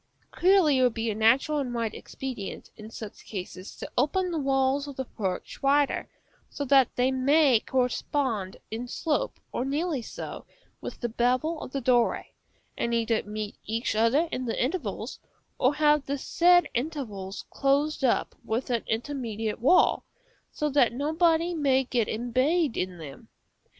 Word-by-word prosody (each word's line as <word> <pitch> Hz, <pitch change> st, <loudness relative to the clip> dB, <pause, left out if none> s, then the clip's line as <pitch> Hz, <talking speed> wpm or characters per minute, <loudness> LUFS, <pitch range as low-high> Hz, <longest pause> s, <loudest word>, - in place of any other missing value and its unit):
Clearly 355 Hz, -7 st, +4 dB
it -, -, +3 dB
will 250 Hz, -, +5 dB
be 225 Hz, -1 st, -2 dB
a -, -, -2 dB
natural 245 Hz, +8 st, +3 dB
and 250 Hz, -3 st, -3 dB
right 230 Hz, -2 st, -1 dB
expedient, 255 Hz, -7 st, -7 dB
in 215 Hz, 0 st, -10 dB
such 220 Hz, -2 st, -9 dB
cases, 185 Hz, -1 st, -7 dB
to -, -, -8 dB
open 360 Hz, +8 st, +1 dB
the 330 Hz, -, -1 dB
walls 270 Hz, 0 st, +1 dB
of 285 Hz, -, -7 dB
the 265 Hz, -, -3 dB
porch 190 Hz, -6 st, -4 dB
wider, 280 Hz, +1 st, +2 dB, 0.4 s
so 285 Hz, -, -4 dB
that 270 Hz, -2 st, +4 dB
they 250 Hz, +1 st, +2 dB
may 265 Hz, -1 st, +4 dB
correspond 250 Hz, -5 st, -1 dB
in 230 Hz, +3 st, -4 dB
slope, 300 Hz, +4 st, -2 dB
or 245 Hz, -, -2 dB
nearly 290 Hz, +1 st, -1 dB
so, -, -, -7 dB, 0.4 s
with -, -, -7 dB
the 240 Hz, -, 0 dB
bevel 255 Hz, +8 st, 0 dB
of -, -, -7 dB
the 275 Hz, -, -3 dB
doorway, 240 Hz, -1 st, +1 dB, 0.4 s
and 235 Hz, 0 st, -1 dB
either 230 Hz, -1 st, +1 dB
meet 210 Hz, 0 st, -6 dB
each 225 Hz, +1 st, -2 dB
other 230 Hz, +9 st, +3 dB
in 255 Hz, -, -3 dB
the 230 Hz, -, -2 dB
intervals, 310 Hz, +9 st, -2 dB, 0.4 s
or 260 Hz, +3 st, +3 dB
have 300 Hz, -1 st, +3 dB
the 280 Hz, +1 st, -1 dB
said 350 Hz, +5 st, +4 dB
intervals 235 Hz, -9 st, -4 dB
closed 280 Hz, +2 st, +1 dB
up 250 Hz, -, +2 dB
with 235 Hz, +3 st, -2 dB
an 235 Hz, -2 st, 0 dB
intermediate 225 Hz, -3 st, -3 dB
wall, 270 Hz, +10 st, +4 dB, 0.5 s
so 300 Hz, -, -1 dB
that 275 Hz, -5 st, +3 dB
nobody 320 Hz, +5 st, +2 dB
may 275 Hz, -4 st, +2 dB
get 240 Hz, -3 st, 0 dB
embayed 255 Hz, +7 st, +1 dB
in 180 Hz, -1 st, -3 dB
them. 145 Hz, -4 st, -10 dB
260 Hz, 160 wpm, -27 LUFS, 230-290 Hz, 0.5 s, will